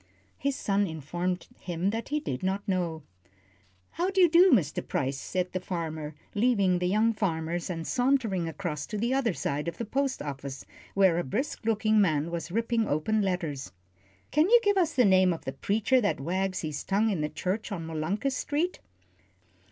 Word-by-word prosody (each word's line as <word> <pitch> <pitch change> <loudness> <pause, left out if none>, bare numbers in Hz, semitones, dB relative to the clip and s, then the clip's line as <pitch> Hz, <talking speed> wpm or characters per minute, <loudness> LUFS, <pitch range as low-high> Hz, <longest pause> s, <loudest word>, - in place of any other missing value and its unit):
His 280 0 0
son 200 -5 +1
informed 175 +3 -3
him 175 +2 -1
that 225 +1 -4
he 300 +1 0
did 130 - -4
not 195 +3 -2
know. 175 -5 -1 0.9
"How 350 +3 -1
d'ye 380 -2 +5
do, 345 +3 +6
Mr. 165 - +2
Price," 135 0 -1
said 180 -1 -2
the 185 - -2
farmer, 160 -4 -4 0.2
leaving 205 -5 +2
the 180 - 0
young 215 +4 +3
farmers, 170 -4 -2
and 165 -2 -4
sauntering 240 - +1
across 160 -4 -4
to 210 - -4
the 235 +5 0
other 245 -8 +1
side 145 +3 -2
of 170 - -4
the 235 - -3
post 270 +4 -1
office, 140 -1 -6 0.3
where 190 -4 +4
a - - 0
brisk 230 - -3
looking 215 -1 +3
man 160 -3 +1
was 170 -1 -4
ripping 230 +1 0
open 210 +9 +1
letters. 170 -8 -2 0.6
"Can 310 +5 +3
you 480 +1 +8
give 410 -1 +3
us 350 -4 +1
the 250 -3 +5
name 185 -1 +5
of 165 - -8
the 135 - -3
preacher 220 - +2
that 205 - 0
wags 185 +5 -1
his 155 -2 -4
tongue 210 +3 +1
in 180 -6 -1
the 150 - -1
church 190 +8 -3
on 170 -5 -4
Molunkus 175 - -2
Street?" 310 +6 -1
190 Hz, 185 wpm, -28 LUFS, 165-230 Hz, 0.9 s, you